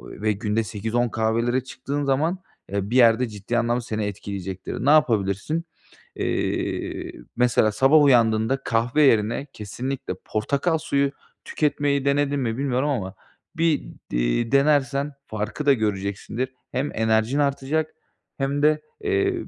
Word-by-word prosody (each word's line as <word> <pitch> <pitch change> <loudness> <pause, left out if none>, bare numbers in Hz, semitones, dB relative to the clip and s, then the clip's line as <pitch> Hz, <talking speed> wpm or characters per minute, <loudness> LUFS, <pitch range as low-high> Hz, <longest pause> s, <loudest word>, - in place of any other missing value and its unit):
ve 110 +1 -2
günde 105 +2 -1
8-10 110 +3 -1
kahvelere 115 +3 0
çıktığın 140 +2 -4
zaman, 150 +7 +1 0.3
eee, 100 0 -2
bir 125 - 0
yerde 120 0 +5
ciddi 105 +3 -3
anlamda 120 +1 +1
seni 110 -3 -3
etkileyecektir. 95 -2 -5
Ne - - +6
yapabilirsin? 120 - +2 0.5
Eee, - - -2 0.2
mesela 120 -3 +3
sabah 135 +7 +5
uyandığında 115 -2 +4
kahve 120 +6 +1
yerine 115 0 +3
kesinlikle 125 +2 -5
portakal 140 +10 0
suyu 140 -2 0 0.3
tüketmeyi 145 -2 0
denedin 140 0 +1
mi 115 -2 -2
bilmiyorum 135 0 0
ama 105 -10 -2 0.4
bir 165 -2 +2 0.3
d - - -1
eee, - - 0
denersen 140 0 +2
farkı 110 +7 -4
da 140 - +7
göreceksindir. 105 +3 -2 0.2
Hem 135 +3 -1
enerjin 110 +4 +1
artacak 145 +2 0 0.5
hem 140 +1 -1
de, 155 0 +3 0.2
eee, 390 -2 +1
125 Hz, 130 wpm, -24 LUFS, 110-140 Hz, 0.5 s, da